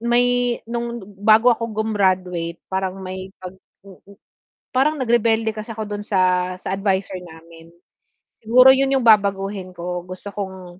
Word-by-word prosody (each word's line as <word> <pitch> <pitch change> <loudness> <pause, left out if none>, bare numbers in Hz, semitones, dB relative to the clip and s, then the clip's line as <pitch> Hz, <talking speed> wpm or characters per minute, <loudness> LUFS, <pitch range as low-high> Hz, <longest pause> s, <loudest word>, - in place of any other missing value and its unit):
may 245 +1 +1
nung 235 -1 -4 0.2
bago 220 +3 +5
ako 230 0 -4
grumaduate 185 -6 -1
parang 190 0 -3
may 185 0 -7
pag, 185 0 -8 0.3
mm, 200 +1 -16 0.6
parang 275 +4 +2
nag-rebelde 225 -2 +2
kasi 215 +1 -7
ako 220 0 -4
do'n 205 0 -5
sa, 185 -2 +1
sa 185 - -6
adviser 195 -1 -1
namin. 165 -1 -14 0.8
Siguro 250 +4 +6
'yon 270 0 +1
yung 260 - 0
babaguhin 200 -3 +2
ko 175 0 -5
gusto 185 +2 -9
kong, 190 -3 -7
200 Hz, 140 wpm, -21 LUFS, 185-230 Hz, 0.8 s, Siguro